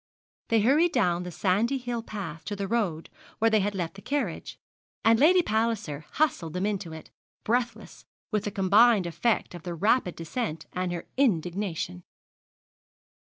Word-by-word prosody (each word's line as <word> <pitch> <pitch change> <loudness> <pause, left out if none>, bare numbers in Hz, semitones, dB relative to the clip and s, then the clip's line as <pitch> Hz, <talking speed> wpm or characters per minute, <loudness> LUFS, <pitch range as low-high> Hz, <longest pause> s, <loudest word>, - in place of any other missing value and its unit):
They 225 -1 +4
hurried 300 +10 +4
down 180 -8 +2
the 180 0 -6
sandy 205 - +1
hill 245 -2 -3
path 200 -8 -7
to 205 - -3
the 200 -1 -3
road 190 -8 -1 0.3
where 225 0 +3
they 215 - +4
had 205 +1 -1
left 175 -3 -3
the 195 - -12
carriage, 280 +7 -3 0.5
and 225 0 +5
Lady 355 +5 +6
Palliser 215 - -1
hustled 255 - 0
them 180 +2 -1
into 200 -5 -2
it, 160 0 -10 0.3
breathless, 235 -1 -2 0.3
with 210 -1 0
the - - 0
combined 205 +1 +4
effect 210 +7 0
of 175 - -8
the 175 0 -5
rapid 205 +1 +2
descent 165 -1 -4
and 180 0 -2
her 175 -1 -5
indignation. 180 - 0
205 Hz, 160 wpm, -27 LUFS, 175-235 Hz, 0.5 s, Lady